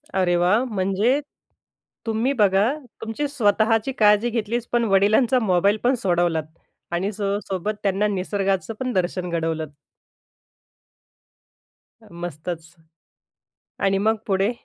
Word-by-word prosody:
अरे 180 -2 +2
वाह! 180 +7 +3
म्हणजे 210 +4 +1 0.9
तुम्ही 225 +4 0
बघा, 200 0 +4 0.3
तुमची 225 +6 -3
स्वतःची 225 -2 +2
काळजी 210 +2 +5
घेतलीच 235 +1 -2
पण 240 -1 +2
वडिलांचा 215 +6 +4
मोबाईल 200 -1 +2
पण 250 +2 +3
सोडवलात 175 -3 +1 0.5
आणि 175 +3 0
अ, - - -2
सो 200 -1 -2
सोबत 195 +2 -2
त्यांना 200 +1 +1
निसर्गाचपण 200 +5 -2
दर्शन 180 -1 -1
घडवलंत. 160 -3 -2 2.3
अ, - - -18
मस्तच. 165 -1 -6 1.1
आणि 195 0 +3
मग 220 - +4
पुढे? 195 +2 +2
200 Hz, 110 wpm, -23 LUFS, 180-225 Hz, 2.3 s, काळजी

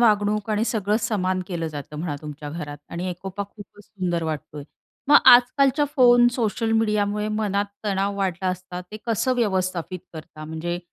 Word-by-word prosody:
वागणूक 210 -2 +2
आणि 215 +1 +1
सगळं 210 -2 0
समान 185 -5 0
केलं 170 -3 -3
जातं 150 0 -8
म्हणा 160 -3 -3
तुमच्या 150 -1 -7
घरात. 145 -2 -6
आणि 175 +2 -3
एकोपा 190 +3 -5
खूपच 205 0 -14
सुंदर 180 -4 -2
वाटतोय. 150 -2 -5 0.5
मग 290 - +9 0.2
आजकालच्या 265 +4 +4
फोन 245 -1 +7
सोशल 225 -1 -1
मीडियामुळे 210 -1 +1
मनात 210 -2 0 0.2
तणाव 200 0 0
वाढला 190 -2 -1
असता, 185 0 -5
ते 180 +4 -10
कसं 230 +3 +1
व्यवस्थापित 185 -5 -1
करता? 155 -1 -10
म्हणजे 160 +3 -4
195 Hz, 155 wpm, -23 LUFS, 175-215 Hz, 0.5 s, मग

